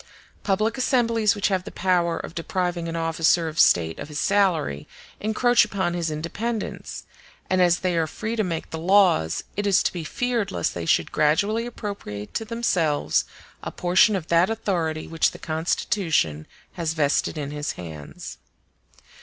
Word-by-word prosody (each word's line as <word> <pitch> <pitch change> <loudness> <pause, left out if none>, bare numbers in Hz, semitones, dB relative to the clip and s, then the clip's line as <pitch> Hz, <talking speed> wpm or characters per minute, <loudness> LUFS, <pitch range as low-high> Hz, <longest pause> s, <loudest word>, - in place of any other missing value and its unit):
Public 215 +5 0
assemblies 230 -5 +2
which 205 - 0
have 190 -2 0
the - - -7
power 175 -2 +1
of - - -7
depriving 175 0 -2
an 165 - -4
officer 165 0 +2
of 160 +1 -5
state 80 -2 +4
of - - -6
his 150 -1 -7
salary 175 - +1 0.3
encroach 235 +3 +3
upon 190 -3 -1
his 170 -2 -1
independence; 200 +9 -4 0.5
and 185 0 +3
as 175 -1 +3
they 180 -2 0
are 165 -1 +1
free 220 +7 -4
to 220 - +1
make 165 -4 -4
the 160 - -4
laws, 175 - +3
it 205 0 -1
is 195 - +4
to - - 0
be 175 -2 -4
feared 235 +5 -1
lest 85 -1 -1
they 85 -1 -5
should 80 - +2
gradually 205 +10 +1
appropriate 200 - -7
to 225 - -2
themselves 165 - +1 0.4
a - - -5
portion 185 +4 +3
of 180 -5 -3
that 170 +3 +4
authority 175 -8 -2
which 165 0 +1
the - - -11
Constitution 160 - -1 0.3
had 170 - -4
vested 155 0 +1
in 145 -1 -4
his 150 0 -3
hands. 80 -4 -9
175 Hz, 165 wpm, -24 LUFS, 155-205 Hz, 0.5 s, state